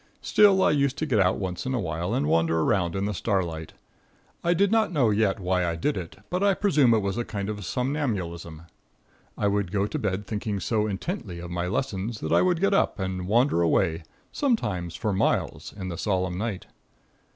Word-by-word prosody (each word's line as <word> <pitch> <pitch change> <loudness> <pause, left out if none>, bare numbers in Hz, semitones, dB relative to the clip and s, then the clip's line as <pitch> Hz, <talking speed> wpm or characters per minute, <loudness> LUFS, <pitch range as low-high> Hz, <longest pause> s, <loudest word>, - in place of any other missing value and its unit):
Still, 195 -2 +5
I - - +4
used 140 -2 +1
to 155 - -1
get 125 -8 +1
out 95 -1 +3
once 90 -3 -4
in 130 - 0
a - - 0
while 85 0 -3
and - - +1
wander 80 +1 +2
around 90 -2 +1
in 95 +1 -1
the 105 - -1
starlight. 85 -6 -2 0.7
I 175 +1 +2
did 200 +3 +3
not 225 -4 +3
know 130 -10 +3
yet 105 -2 +1
why 90 -1 0
I 85 -1 -1
did 145 - -1
it, 85 -3 -6 0.2
but 180 +1 0
I 200 -1 +4
presume 150 - +4
it 110 - +1
was 100 +3 -2
a - - 0
kind 100 -3 -4
of 105 -1 -5
somnambulism. 90 - -3 0.7
I 105 - +1
would 100 -3 0
go 100 0 +1
to - - -3
bed 100 0 -2
thinking 105 -1 -3
so 110 +1 0
intently 100 - -4
of 85 0 -7
my 90 0 -2
lessons 105 +1 -2
that - - -3
I - - +5
would 180 -2 +2
get 200 +2 +2
up 195 - +2
and 95 -2 -3
wander 115 -3 +3
away, 85 0 +2 0.3
sometimes 105 - -1
for 105 - -1
miles, 95 - 0
in 95 -2 -5
the 85 0 -5
solemn 95 -3 0
night. 100 0 -3
100 Hz, 205 wpm, -26 LUFS, 90-125 Hz, 0.7 s, Still